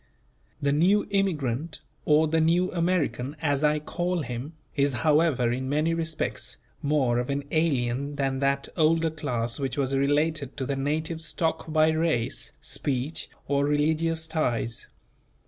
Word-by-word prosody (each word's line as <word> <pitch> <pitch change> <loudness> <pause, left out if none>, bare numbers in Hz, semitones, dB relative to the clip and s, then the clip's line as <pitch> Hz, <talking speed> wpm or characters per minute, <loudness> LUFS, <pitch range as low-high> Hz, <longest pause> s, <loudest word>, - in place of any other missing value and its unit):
The 140 - +1
new 180 +8 +3
immigrant, 160 -7 -1 0.2
or 155 +1 +4
the 160 +1 +2
new 175 +3 +3
American, 155 -7 0
as 145 +1 0
I 150 0 +4
call 175 +2 -2
him, 125 +5 -5 0.2
is 140 -1 +2
however 150 -6 +3
in 130 +2 -2
many 155 +3 +1
respects, 165 -1 -2 0.2
more 140 -5 +2
of 125 - -3
an 140 0 -1
alien 140 -3 0
than 135 -1 -1
that 140 0 +1
older 160 0 +3
class 120 -6 -2
which 135 -1 -2
was 135 -1 +1
related 145 +1 +1
to 135 - -2
the 140 - -1
native 155 +4 -2
stock 160 0 -1
by 155 0 +4
race, 135 -8 0
speech, 145 -1 -2 0.2
or 140 0 +2
religious 160 +2 +1
ties. 120 -7 -1
150 Hz, 145 wpm, -26 LUFS, 135-160 Hz, 0.2 s, or